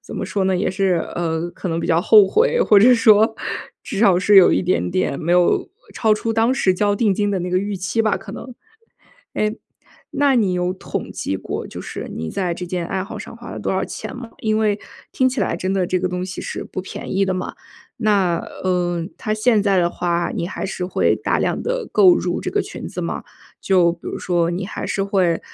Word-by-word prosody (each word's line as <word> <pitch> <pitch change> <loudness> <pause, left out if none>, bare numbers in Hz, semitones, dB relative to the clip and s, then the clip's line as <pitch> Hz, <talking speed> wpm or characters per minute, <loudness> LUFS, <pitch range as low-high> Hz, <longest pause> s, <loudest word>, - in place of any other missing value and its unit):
怎 - - -10
么 - - -3
说 195 -2 -1
呢， 190 -1 +2
也 185 - 0
是， 185 -3 +1
呃， 170 0 -2
可 185 - -6
能 165 0 -1
比 - - -3
较 165 0 +3
后 210 +1 +6
悔， 485 +2 +2
或 210 - +6
者 245 +4 +7
说 220 -1 +5 0.5
至 195 - -5
少 200 -5 +5
是 205 +2 +4
有 185 - +8
一 - - +2
点 130 - 0
点 95 +9 -1
没 170 +2 0
有 180 -1 +3 0.2
超 220 -2 +2
出 225 +1 -2
当 225 +3 +2
时 190 -7 +2
交 205 +2 +1
定 205 -1 +2
金 205 +1 0
的 190 -2 -1
那 180 - -3
个 180 - +2
预 200 0 -3
期 190 +5 -1
吧， 220 -2 +2
可 215 - -10
能。 250 -1 -9 0.8
哎， 215 0 0 0.6
那 285 -2 +2
你 200 -5 +2
有 180 +1 -1
统 - - -5
计 95 - -3
过， - - -5
就 - - -8
是 - - -6
你 80 0 -4
在 180 -3 -2
这 180 +1 -5
件 175 -1 -3
爱 190 +2 -2
好 195 - -7
上 - - -9
花 235 0 -10
了 - - -6
多 - - -2
少 190 - 0
钱 - - -6
吗？ 245 -2 -8
因 215 -1 +1
为 210 -1 +1 0.3
听 260 - +1
起 255 -3 0
来， 175 -3 0
真 185 +2 -2
的 185 -2 +1
这 185 - 0
个 185 - -1
东 180 0 -3
西 190 - -6
是 - - -5
不 185 - -6
便 190 - -6
宜 195 - +3
的 190 - -1
嘛， 185 0 -4 0.4
那， 200 -6 +2 0.3
嗯， 175 -1 -1
它 215 - -3
现 215 -1 +2
在 195 -2 +2
的 170 -1 +3
话， 175 -1 -1
你 170 - -2
还 190 - -4
是 185 -1 -4
会 185 - +1
大 - - 0
量 - - -1
地 - - -2
购 190 -4 +6
入 175 -1 -2
这 - - -3
个 410 - +1
裙 - - -7
子 - - -6
吗？ - - -4 0.3
就 180 -3 +3
比 170 - -27
如 - - -5
说 170 -2 0
你 180 +2 -3
还 - - -5
是 195 - -1
会， 185 -4 +1
190 Hz, 255 characters per minute, -20 LUFS, 180-215 Hz, 0.8 s, 有